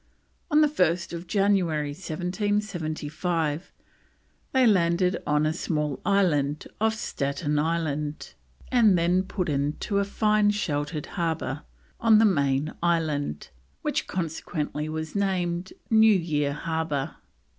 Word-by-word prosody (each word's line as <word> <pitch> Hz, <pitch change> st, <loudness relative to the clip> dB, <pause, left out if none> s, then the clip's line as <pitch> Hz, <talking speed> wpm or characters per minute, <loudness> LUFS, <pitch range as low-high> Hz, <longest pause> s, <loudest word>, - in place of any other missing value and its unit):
On 305 Hz, -1 st, +5 dB
1st 175 Hz, -, 0 dB
January 185 Hz, -8 st, +1 dB
1775 175 Hz, -3 st, -2 dB, 0.8 s
they 260 Hz, -1 st, +4 dB
landed 180 Hz, -3 st, +3 dB
on 150 Hz, +1 st, +2 dB
a 155 Hz, -, +1 dB
small 150 Hz, -4 st, -2 dB
island 155 Hz, -8 st, +1 dB, 0.2 s
off 220 Hz, 0 st, +2 dB
Staten 145 Hz, -5 st, -2 dB
Island, 150 Hz, -, -2 dB, 0.4 s
and 220 Hz, -7 st, +5 dB
then 175 Hz, +2 st, +3 dB
put 190 Hz, -1 st, -3 dB
in 145 Hz, 0 st, 0 dB
to 200 Hz, -1 st, 0 dB
a -, -, +2 dB
fine 210 Hz, +1 st, +2 dB
sheltered 150 Hz, -7 st, -2 dB
harbour 160 Hz, -5 st, -2 dB, 0.4 s
on 225 Hz, -2 st, +6 dB
the 225 Hz, -, +6 dB
main 140 Hz, -5 st, +1 dB
island, 155 Hz, -, 0 dB, 0.3 s
which -, -, -1 dB
consequently 155 Hz, -3 st, -3 dB
was 160 Hz, 0 st, -4 dB
named 185 Hz, -2 st, -1 dB, 0.2 s
New 220 Hz, -1 st, +6 dB
Year 150 Hz, -5 st, 0 dB
Harbour. 160 Hz, -3 st, -2 dB
170 Hz, 115 wpm, -26 LUFS, 150-195 Hz, 0.8 s, on